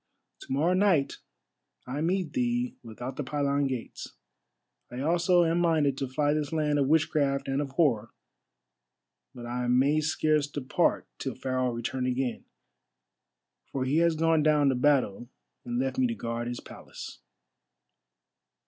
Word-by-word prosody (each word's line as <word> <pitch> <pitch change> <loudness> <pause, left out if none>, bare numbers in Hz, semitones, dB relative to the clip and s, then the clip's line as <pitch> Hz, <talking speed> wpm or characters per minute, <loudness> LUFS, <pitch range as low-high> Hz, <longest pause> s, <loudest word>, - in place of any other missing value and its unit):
"To - - -11
morrow 155 +7 +2
night 185 -7 +2 0.7
I 135 +4 -4
meet 180 +1 -1
thee 245 -1 0
without 120 +3 -7
the 145 - -2
pylon 140 0 0
gates. 130 -3 -6 0.8
I 125 +1 -6
also 175 +3 +3
am 165 +1 +1
minded 155 -5 +2
to 135 - -2
fly 145 +3 +1
this 150 -2 -2
land 150 -2 +1
of 135 - +2
witchcraft 145 -3 +1
and 135 +1 0
of 140 -2 -5
horror, 120 -9 +2 1.3
but 120 -1 -8
I 125 +1 -3
may 135 +5 +3
scarce 155 -1 +1
depart 140 -2 0
till - - -4
Pharaoh 130 -1 -1
return 125 +2 -3
again. 125 -1 -2 1.3
For 130 -1 -2
he 140 +4 +1
has 170 -1 +3
gone 165 0 +3
down 150 -2 +4
to 130 - +1
battle 125 -4 +1 0.4
and 240 0 -3
left 265 +1 -1
me 255 - +4
to 235 - -3
guard 115 - -4
his 120 0 -5
palace." - - -10
145 Hz, 150 wpm, -28 LUFS, 130-165 Hz, 1.3 s, down